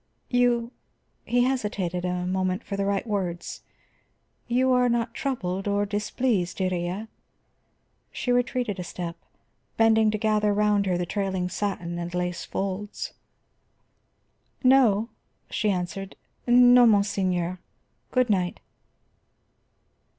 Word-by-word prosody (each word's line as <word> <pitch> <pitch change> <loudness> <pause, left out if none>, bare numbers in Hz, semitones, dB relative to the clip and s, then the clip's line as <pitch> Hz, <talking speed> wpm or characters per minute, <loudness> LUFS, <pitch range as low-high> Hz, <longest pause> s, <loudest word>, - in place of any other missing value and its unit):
"You," 245 -1 +2 0.5
he 245 0 +2
hesitated 205 -9 -1
a 180 0 -2
moment 185 0 -1
for 200 - -5
the 200 0 -1
right 200 +1 0
words. 185 -6 -3 0.9
"You 255 +2 +2
are 250 -1 +4
not 235 0 0
troubled, 195 -9 -3
or 205 0 +1
displeased, 205 -2 -1
Iría?" 185 +2 -2 1.0
She 250 - -2
retreated 245 -4 0
a - - -3
step, 170 -1 -5 0.6
bending 220 -1 +4
to 215 - 0
gather 210 -1 +1
round 210 -1 +2
her 180 -1 +1
the 175 - -1
trailing 190 -1 -2
satin 180 -3 -3
and 175 +1 -5
lace 180 0 -2
folds. 200 +2 -4 1.5
"No," 240 -4 +4 0.4
she 215 - 0
answered. 190 +1 -3 0.3
"No, 245 0 +7
monseigneur. 185 -4 +1 0.5
Good 255 -3 +2
night." 180 -3 0
205 Hz, 115 wpm, -26 LUFS, 180-235 Hz, 1.5 s, No